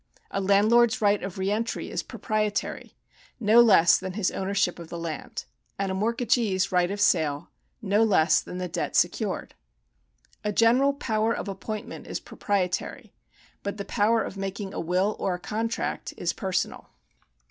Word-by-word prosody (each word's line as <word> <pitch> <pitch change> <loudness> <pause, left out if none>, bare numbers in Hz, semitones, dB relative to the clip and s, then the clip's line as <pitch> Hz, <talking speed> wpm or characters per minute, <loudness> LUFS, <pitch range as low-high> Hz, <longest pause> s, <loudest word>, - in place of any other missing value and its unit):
A 195 - -1
landlord's 220 +5 +4
right 205 -1 +3
of 195 -1 -6
re 190 +1 -1
entry 225 +2 -2
is - - -1
proprietary, 215 -1 -3 0.4
no 225 +1 +6
less 200 -7 +6
than 185 0 -5
his 200 -1 0
ownership 190 -2 -1
of 170 - -8
the 170 - -6
land; 165 -2 -5 0.3
and 195 -1 -1
a - - -1
mort 220 +5 0
gagee's 215 -6 +1
i - - +3
ight 175 - 0
of 200 +1 -4
sale, 150 -7 +1 0.3
no 205 +1 +2
less 195 -8 +4
than 180 - -8
the 180 0 -3
debt - - -3
secured. - - 0 0.9
A 210 - 0
general 245 +6 +4
power 225 -4 0
of - - -5
appointment 205 +2 -6
is - - -4
proprietary, 185 -3 -3 0.5
but 200 +1 -4
the 200 - -5
power 220 +3 +2
of 195 - -7
making 195 0 -4
a - - -4
will 185 +5 0
or 185 - 0
a - - -8
contract 225 +5 -3
is 170 -1 -1
personal. 190 -2 -3
200 Hz, 170 wpm, -26 LUFS, 185-220 Hz, 0.9 s, no